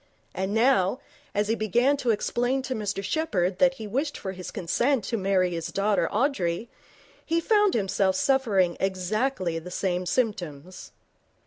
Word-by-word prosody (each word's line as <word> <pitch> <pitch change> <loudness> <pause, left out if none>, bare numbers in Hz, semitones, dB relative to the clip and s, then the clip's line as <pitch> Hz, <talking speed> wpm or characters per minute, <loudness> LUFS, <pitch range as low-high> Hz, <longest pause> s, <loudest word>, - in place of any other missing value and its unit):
And 190 +1 -2
now, 225 -1 +3 0.4
as 205 0 +1
he 220 - +2
began 240 +6 +2
to 250 -3 -2
explain 245 +4 0
to 260 - -3
Mr 205 -3 -3
Sheppherd 190 - -1
that 270 -1 +4
he 220 - -7
wished 275 +8 -2
for 190 - -5
his 185 -1 -7
consent 230 +8 0
to 230 - -2
marry 190 -3 +1
his 165 -1 -3
daughter 200 +1 +1
Audrey, 220 -4 0 0.5
he 330 +1 +1
found 415 +2 +3
himself 195 -2 +1
suffering 200 -8 +2
exactly 190 -1 -1
the 170 +2 -9
same 180 -1 -2
symptoms. 185 - -3
205 Hz, 150 wpm, -26 LUFS, 185-255 Hz, 0.5 s, that